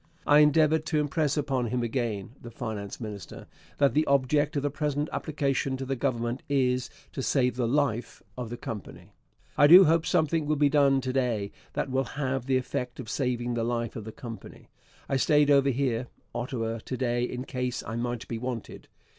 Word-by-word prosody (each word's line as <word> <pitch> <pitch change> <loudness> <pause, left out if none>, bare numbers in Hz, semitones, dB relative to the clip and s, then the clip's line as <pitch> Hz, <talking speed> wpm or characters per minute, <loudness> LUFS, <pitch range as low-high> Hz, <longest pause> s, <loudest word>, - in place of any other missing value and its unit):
I 145 0 +6
endeavoured 155 +1 +4
to 155 -2 +1
impress 150 0 0
upon 135 -4 0
him 120 +1 -1
again 115 -5 -2
[the 120 - -9
finance 110 -4 -6
minister] 105 -6 -8 0.3
that 140 -1 +3
the 155 +1 +2
object 140 +2 +2
of 140 - 0
the 145 - 0
present 150 0 -1
application 140 -3 -1
to 135 - -5
the 135 +1 -1
Government 120 -1 -1
is 125 -2 +1 0.2
to - - -3
save 125 -2 +1
the 125 -2 0
life 125 -3 -1
of 125 -3 -5
the 120 - -5
Company.... 105 -4 -8 0.5
I 145 - +8
do 180 +5 +10
hope 165 +1 +2
something 160 -2 +1
will 155 - +2
be 145 0 +3
done 140 -2 +4
to 130 0 -3
day 115 -6 0 0.2
that 135 - -2
will 135 +1 +1
have 135 -3 -1
the 130 -1 +3
effect 125 -1 -4
of 110 - -6
saving 120 -3 -1
the 115 -1 -1
life 115 -1 -2
of 110 - -6
the 110 - -6
Company. 115 0 -10 0.4
I 135 - +1
stayed 145 +1 +4
over 140 -1 +5
here 125 -2 0 0.3
[Ottawa] 115 -2 -3
to 130 +3 -5
day 120 -1 0
in 125 0 -3
case 125 -2 -3
I 110 - -5
might 120 0 -3
be 115 - -4
wanted. 125 -2 -6
130 Hz, 195 wpm, -28 LUFS, 120-145 Hz, 0.5 s, do